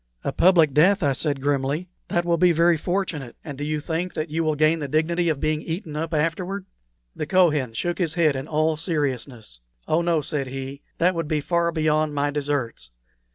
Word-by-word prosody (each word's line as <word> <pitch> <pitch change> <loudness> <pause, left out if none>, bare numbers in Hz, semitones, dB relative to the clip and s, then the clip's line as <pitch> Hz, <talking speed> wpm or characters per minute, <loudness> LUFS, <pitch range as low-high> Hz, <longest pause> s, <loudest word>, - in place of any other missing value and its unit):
"A - - -1
public 170 -6 +4
death!" 185 +6 +4
I 140 -2 +3
said, 140 0 -1
grimly. 145 +4 0 0.2
"That 175 0 0
will 170 -1 +1
be 180 0 +5
very 170 +1 +4
fortunate! 165 -6 -3
And 145 -3 -7
do 145 - -6
you 155 +1 -1
think 165 +4 -3
that 155 0 -3
you 165 +1 0
will 155 -1 +1
gain 155 +2 +3
the 145 - -3
dignity 165 +4 +1
of 150 -3 -1
being 155 +1 0
eaten 165 -1 -5
up 160 +2 -3
afterward?" 175 +5 -1 0.5
The 150 - -4
Kohen 150 -10 +3
shook 175 - -2
his 165 -4 0
head 160 -5 +3
in 135 +2 -4
all 155 0 +1
seriousness. 135 - -3 0.3
"Oh 160 +2 +2
no," 170 -2 +1
said 145 -2 -3
he; 135 +2 -6 0.2
"that 180 +2 +3
would 165 -3 -3
be 155 0 0
far 170 +3 0
beyond 155 -2 +1
my 145 0 0
deserts. 140 - -3
155 Hz, 200 wpm, -24 LUFS, 145-170 Hz, 0.5 s, be